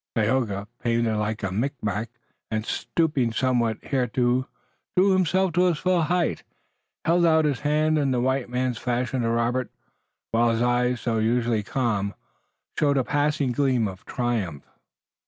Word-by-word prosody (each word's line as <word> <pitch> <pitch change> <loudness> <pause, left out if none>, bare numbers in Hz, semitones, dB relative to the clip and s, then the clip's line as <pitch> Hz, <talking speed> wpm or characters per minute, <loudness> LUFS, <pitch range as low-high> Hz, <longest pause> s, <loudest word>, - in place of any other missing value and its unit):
Tayoga, 105 -3 0
painted 115 -1 +1
like 105 0 -2
a 95 - -1
Micmac 110 -1 -2 0.4
and 110 -1 -2
stooping 145 -7 0
somewhat 120 -2 +1
hitherto, 125 -1 0 0.5
drew 195 +2 +5
himself 185 0 +2
to 180 +2 +3
his 175 -4 +2
full 180 +1 +1
height, 175 +2 0 0.6
held 170 +1 +3
out 160 -2 +4
his 145 -4 0
hand 155 +1 +2
in 140 -2 +1
the 125 -2 +1
white 130 0 0
man's 125 -1 -1
fashion 125 +1 -1
to 115 - 0
Robert, 115 +1 0 0.6
while 115 +1 +3
his 115 0 0
eyes, 125 -1 +1
usually 115 -1 +1
so - - -17
calm, 105 -6 0 0.6
showed 140 -1 +3
a 130 - +2
passing 145 -1 0
gleam 125 -3 +1
of 95 0 -9
triumph. 110 - -2
125 Hz, 150 wpm, -25 LUFS, 115-145 Hz, 0.6 s, drew